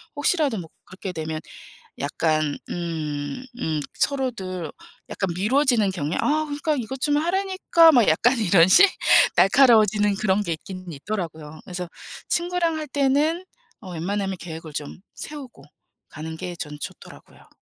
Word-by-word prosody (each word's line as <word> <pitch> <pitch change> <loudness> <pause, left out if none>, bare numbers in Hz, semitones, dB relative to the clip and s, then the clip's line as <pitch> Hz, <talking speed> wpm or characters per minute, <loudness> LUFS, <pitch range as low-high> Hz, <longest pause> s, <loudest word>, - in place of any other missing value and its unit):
혹시라도 290 -4 +1
뭐 165 - -9 0.2
그렇게 185 0 -7
되면 160 -1 -4 0.6
약간 155 0 0
음 165 -3 -3 0.5
음 155 -6 -1
서로들 190 - -2 0.4
약간 195 - -2
미뤄지는 235 +1 +2
경향 155 -3 -3
"아, 305 +1 +1
그러니까 300 +1 -1
이것 260 0 -5
좀 290 0 +2
하라니까." 350 0 +4
막 240 -6 +5
약간 245 +11 +3
이런 180 -5 +5
식? 365 - +8 0.5
날카로워지는 210 0 +5
그런 210 0 +1
게 170 - -3
있기는 185 +2 -9
있더라고요. 160 -2 -6
그래서 180 -1 -5 0.4
친구랑 345 -1 +1
할 310 -1 -5
때는 290 +6 +1 0.3
어 185 -4 -9
웬만하면 195 +3 -2
계획을 160 -2 -8
좀 145 -1 -6 0.2
세우고 270 - -9 0.5
가는 160 +1 -7
게 175 +1 -6
저는 150 -3 -7
좋더라고요. - - -11
200 Hz, 310 characters per minute, -23 LUFS, -, 0.6 s, 식